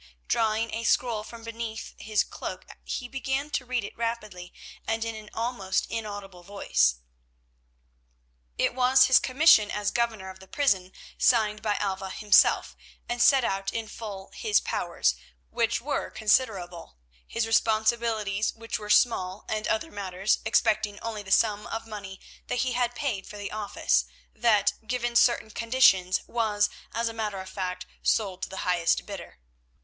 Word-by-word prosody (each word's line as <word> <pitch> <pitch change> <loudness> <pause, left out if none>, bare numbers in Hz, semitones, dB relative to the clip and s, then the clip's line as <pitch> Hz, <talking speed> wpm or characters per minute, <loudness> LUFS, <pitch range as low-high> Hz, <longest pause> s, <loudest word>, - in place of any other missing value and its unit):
Drawing 225 0 +1
a 230 +1 -3
scroll 230 -2 +1
from 230 +1 -11
beneath 230 -1 -6
his 215 -1 0
cloak - - -7 0.2
he 250 - -4
began 270 +3 -3
to 250 -4 -2
read 250 -3 -1
it 200 - -8
rapidly 215 -6 -4 0.4
and 225 0 -1
in 230 - -3
an 215 -1 -10
almost 225 -5 -1
inaudible 205 -5 -6
voice. 70 - +1 1.6
It - - +1
was 255 +1 +5
his 260 - +6
commission 255 -6 +5
as 210 0 -1
governor 225 -5 -1
of 190 - -15
the 190 - -14
prison 190 -9 +1 0.3
signed 215 -3 +3
by 210 -2 0
Alva 195 -1 -2
himself, 210 +2 +3 0.3
and 240 0 -2
set 265 +1 +6
out 195 -2 -1
in 225 -1 -4
full 200 -4 -8
his 435 -3 +2
powers, - - 0 0.4
which 230 -1 +1
were 285 +4 -2
considerable, 195 - 0 0.3
his 230 -1 -1
responsibilities 220 -2 +1
which 230 0 -4
were 210 -1 -8
small, 200 -4 +2
and 215 0 -2
other 330 0 -1
matters, 195 0 -1
excepting 215 -2 +1
only 225 -2 -4
the 195 - -11
sum 210 -2 +3
of 225 0 -5
money 200 -3 -8 0.3
that 245 - 0
he 255 - -1
had 245 0 0
paid 245 -10 -3
for 210 - -9
the 205 -1 -6
office, 200 - 0 0.3
that, 215 -4 +3
given 240 0 -2
certain 235 -2 +3
conditions, 220 -6 +3
was, 210 -3 +1 0.2
as 230 0 -1
a 230 - -3
matter 210 -3 -3
of 190 - -7
fact, 185 -2 -4 0.2
sold 195 -4 0
to - - -3
the 190 - -5
highest 175 -2 +1
bidder. - - -9
220 Hz, 155 wpm, -27 LUFS, 200-235 Hz, 1.6 s, his